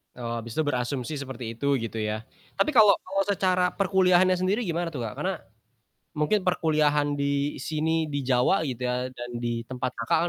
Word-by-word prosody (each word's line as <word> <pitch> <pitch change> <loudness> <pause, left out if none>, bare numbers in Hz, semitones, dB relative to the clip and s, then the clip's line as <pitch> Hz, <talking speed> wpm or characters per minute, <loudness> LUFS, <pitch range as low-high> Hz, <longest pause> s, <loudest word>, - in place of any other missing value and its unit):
Oh, 120 -1 -4
habis 115 0 -8
itu 155 - +2
berasumsi 130 0 -2
seperti 130 -4 -6
itu 140 +1 +1
gitu 115 -1 -4
ya, 110 +1 -2 0.3
tapi 305 - +2
kalo 215 -4 +7
kalo 195 +1 -2
secara 185 -2 +2
perkuliahannya 185 -1 +4
sendiri 200 +6 +1
gimana 170 0 -1
tuh, 130 -7 -5
Kak? 105 - -5
Karena - - 0 0.8
mungkin 185 +7 +1
perkuliahan 150 -4 +2
di 140 +1 0
sini, 160 +3 0
di 145 -1 -2
Jawa 130 +8 +3
gitu 125 -3 -3
ya 125 +1 -1
dan 120 -1 -8
di 120 -1 -3
tempat 130 0 -3
Kakak 160 +9 +1
145 Hz, 175 wpm, -26 LUFS, 125-180 Hz, 0.8 s, kalo